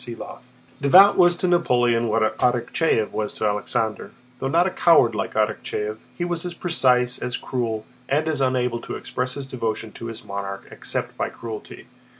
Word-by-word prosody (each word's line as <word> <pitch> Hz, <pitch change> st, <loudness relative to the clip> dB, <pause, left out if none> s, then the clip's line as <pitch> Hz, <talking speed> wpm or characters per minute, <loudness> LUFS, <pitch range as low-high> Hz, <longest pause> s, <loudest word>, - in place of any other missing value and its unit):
CHAPTER 120 Hz, -, -6 dB
V -, -, -6 dB, 0.6 s
Davout 190 Hz, +8 st, +7 dB
was 175 Hz, -1 st, +5 dB
to 185 Hz, -, 0 dB
Napoleon 120 Hz, -9 st, +2 dB
what 110 Hz, 0 st, +1 dB
Arakchéev 125 Hz, 0 st, +1 dB
was 105 Hz, -1 st, -3 dB
to -, -, -2 dB
Alexander—though 110 Hz, +4 st, -3 dB
not 170 Hz, +6 st, +3 dB
a 190 Hz, -, 0 dB
coward 150 Hz, -12 st, +4 dB
like 110 Hz, +1 st, -3 dB
Arakchéev, 105 Hz, 0 st, -1 dB, 0.2 s
he 175 Hz, -, -1 dB
was 175 Hz, -1 st, -2 dB
as 175 Hz, -1 st, -5 dB
precise, 125 Hz, -9 st, +2 dB
as 125 Hz, -, -2 dB
cruel, 115 Hz, -4 st, -3 dB, 0.2 s
and 150 Hz, +3 st, +1 dB
as 155 Hz, -3 st, -1 dB
unable 125 Hz, -2 st, +1 dB
to -, -, -6 dB
express 125 Hz, 0 st, -4 dB
his 140 Hz, -, -5 dB
devotion 115 Hz, -4 st, -3 dB
to 115 Hz, -, -8 dB
his 115 Hz, -1 st, -8 dB
monarch 100 Hz, 0 st, -6 dB
except -, -, -4 dB
by -, -, -1 dB
cruelty. 110 Hz, -2 st, -9 dB
125 Hz, 170 wpm, -23 LUFS, 110-150 Hz, 0.6 s, Davout